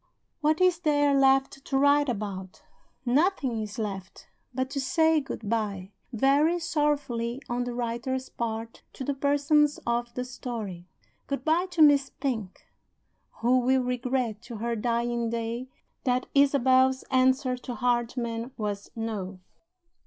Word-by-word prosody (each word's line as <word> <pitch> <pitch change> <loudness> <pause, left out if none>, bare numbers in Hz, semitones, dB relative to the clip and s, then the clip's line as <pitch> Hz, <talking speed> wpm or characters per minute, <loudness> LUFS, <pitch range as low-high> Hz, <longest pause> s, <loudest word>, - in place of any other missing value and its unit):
What 310 0 +2
is 365 -2 +3
there 290 -4 +3
left 270 0 +3
to 270 - -1
write 285 +1 +4
about? 195 -4 -5 0.4
Nothing 265 - +1
is 210 +1 -6
left 195 -4 -6 0.2
but 260 +1 -2
to 275 -1 -2
say 320 +3 +3
good 250 -6 -7
by 200 -4 -2 0.2
(very 280 +8 +3
sorrowfully 290 -7 -1
on 245 +1 -1
the 245 -1 -4
writer's 245 +2 -2
part) 230 0 -5
to - - -6
the 285 - -1
Persons 290 +2 +2
of 235 0 -1
the 250 - -2
Story. 225 -8 -6 0.4
Good 280 +2 -3
by 335 +4 +2
to 345 -3 +3
Miss 285 -2 +5
Pink 225 -9 -3 0.8
who 250 +2 +4
will 255 +1 +2
regret 250 -3 -1
to 235 -1 -9
her 235 +2 -2
dying 235 +1 -1
day 235 +2 -3 0.4
that 250 0 +1
Isabel's 265 -2 +4
answer 260 0 +3
to 245 0 -6
Hardyman 240 0 -1
was 205 -2 -4
No. 210 -4 -4
250 Hz, 140 wpm, -27 LUFS, 230-280 Hz, 0.8 s, Miss